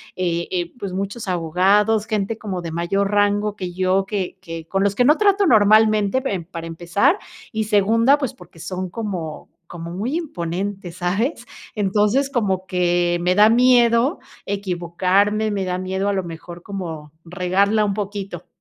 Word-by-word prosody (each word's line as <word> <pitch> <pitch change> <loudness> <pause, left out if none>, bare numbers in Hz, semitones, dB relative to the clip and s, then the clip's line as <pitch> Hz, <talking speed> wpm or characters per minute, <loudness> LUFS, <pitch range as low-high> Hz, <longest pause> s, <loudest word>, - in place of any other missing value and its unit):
eh, 170 -2 -1
eh, 175 -2 -2
pues, 195 -2 -5
muchos 200 +3 -4
abogados, 195 +5 +2
gente 215 0 -2
como 190 -5 -5
de 165 -1 -6
mayor 195 +4 -1
rango 205 0 +1
que 180 -1 -5
yo, 190 +1 +1
que 200 -3 -3
que 165 -3 -7
con 195 0 0
los 200 0 +1
que 245 - +3
no 300 +3 +5
trato 405 -1 +3
normalmente, 215 - +4
em 185 -9 -2
para 165 -2 -7
empezar 175 - +1 0.3
y 220 -1 -2
segunda, 225 +6 +3
pues, 270 -5 -3
porque 175 -2 -16
son 185 +2 -5
como 180 -7 -5 0.2
como 170 -1 -7
muy 220 - -3
imponentes, 190 - -4
¿sabes?, 215 - -1 0.3
entonces, 210 +6 +1
como 195 -8 -1
que 175 -1 +1
me 180 +1 +2
da 210 +2 +6
miedo 245 +3 +4 0.3
equivocarme, 195 +2 0
me 195 -2 -2
da 180 0 -2
miedo 190 +2 -2
a 205 - +1
lo 190 -2 -1
mejor 170 +1 -9
como, 165 -7 -6
regarla 195 +4 +1
un 200 -1 0
poquito. 195 -4 -5
195 Hz, 160 wpm, -21 LUFS, 180-215 Hz, 0.3 s, da